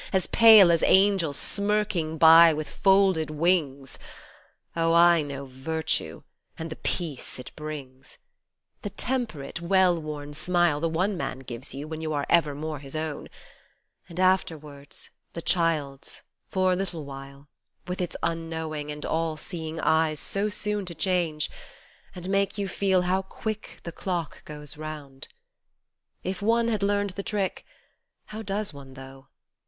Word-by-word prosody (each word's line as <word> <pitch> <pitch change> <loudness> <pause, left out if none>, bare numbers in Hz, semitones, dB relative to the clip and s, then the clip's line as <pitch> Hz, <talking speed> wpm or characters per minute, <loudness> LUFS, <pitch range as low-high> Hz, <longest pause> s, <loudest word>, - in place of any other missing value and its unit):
As 190 -2 +1
pale 220 -6 +8
as 165 - +3
angels 190 -7 +4
smirking 200 -5 0
by, 165 +1 +8
with 155 0 -4
folded 190 -5 +3
wings. 150 -5 0 0.8
Oh! 165 0 +2
I 170 -1 +6
know 140 -1 -6
Virtue, 140 +5 -3 0.3
and 160 0 -6
the - - -4
peace 160 -7 -2
it 125 - -9
brings! 135 -4 -8 0.6
The 205 - -4
temperate, 200 - -3
well 180 -1 +3
worn 145 -1 -6
smile 175 0 +1
The 165 +2 0
one 185 +5 0
man 130 - -3
gives 125 0 -7
you, 145 +2 -6
when 160 0 -6
you 155 -1 -2
are 145 -1 -1
evermore 155 -2 +1
his 140 +1 -9
own: 155 -1 -4 0.8
And 170 +1 -8
afterwards 155 -6 -1 0.2
the 170 - -5
child's, 155 -6 0 0.3
for 185 -1 +2
a - - +3
little 180 -5 -4
while, 140 +1 -10 0.4
With 180 +1 -3
its 175 - -3
unknowing 160 -2 -3
and 150 0 -6
all 160 -1 -1
seeing 160 0 -5
eyes 160 -1 +2
So 200 +2 -1
soon 210 0 -2
to 170 - -7
change, 160 -2 0 0.7
and 180 0 -6
make 195 +1 0
you 200 -1 -1
feel 190 0 +1
how 185 +2 +1
quick 215 +2 -6
The 170 - -6
clock 170 -3 -4
goes 150 -1 -9
round. 150 -3 -7 1.0
If 185 +1 -4
one 230 +2 +2
had 215 -3 -1
learned 205 0 +1
the 200 - -5
trick 200 -2 -3 0.6
(How 215 +1 -7
does 205 -2 -2
one 135 -2 -12
though 135 0 -12
165 Hz, 150 wpm, -26 LUFS, 150-190 Hz, 1.0 s, pale